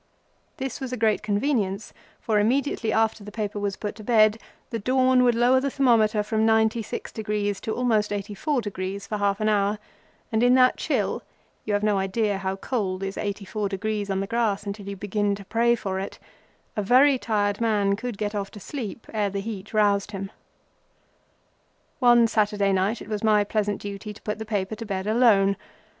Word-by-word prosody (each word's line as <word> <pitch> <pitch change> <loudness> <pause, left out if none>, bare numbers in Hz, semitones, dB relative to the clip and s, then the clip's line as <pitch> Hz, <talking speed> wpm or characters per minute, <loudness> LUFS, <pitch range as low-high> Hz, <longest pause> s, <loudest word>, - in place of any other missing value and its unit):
This 265 0 -4
was 260 -2 -4
a 250 - -3
great 220 -2 +2
convenience, 210 -2 -1 0.3
for 215 -2 +1
immediately 235 0 +1
after 220 -1 +1
the 210 - -9
paper 210 -1 -3
was 200 -1 -2
put 210 - -4
to 215 - -10
bed, 215 -1 +4 0.3
the 230 - -2
dawn 255 +2 +3
would 240 -1 +4
lower 245 +2 +4
the 275 +1 -1
thermometer 225 -6 +3
from 220 +1 -1
96° 220 -2 0
to 220 - -3
almost 225 -4 +1
84° 205 0 -4
for 305 - -7
almost 200 -4 -3
half 205 -1 0
an 215 - 0
hour, 205 0 +2 0.5
and 220 0 +1
in 245 +1 +5
that 255 0 +5
chill—you 215 - -4
have 205 0 +1
no 210 -2 +2
idea 200 +1 0
how 190 0 -2
cold 195 -3 -2
is 195 0 -3
84° 205 0 -3
on 195 0 0
the - - -2
grass 215 -2 0
until 200 0 -6
you 200 - -4
begin 205 +1 -1
to 200 -1 -11
pray 235 +3 +2
for 190 -4 -3
it—a 200 +2 -9
very 260 +6 +5
tired 205 -2 0
man 205 -3 +2
could 230 0 -5
set 210 0 -2
off 200 -1 -3
to 210 - -11
sleep 230 -1 -6
ere 210 -2 +1
the 200 0 -3
heat 205 -1 -6
roused 205 -1 +2
him. 195 0 -5 1.7
One 240 -2 +6
Saturday 205 -3 +1
night 195 +4 0
it - - -13
was 210 -1 -3
my 210 -1 +4
pleasant 205 -1 -1
duty 205 +1 -6
to - - -15
put 210 0 -3
the 220 - -5
paper 200 -1 -1
to 230 - -6
bed 190 -1 -3
alone. 210 -3 +4
210 Hz, 180 wpm, -25 LUFS, 200-230 Hz, 1.7 s, One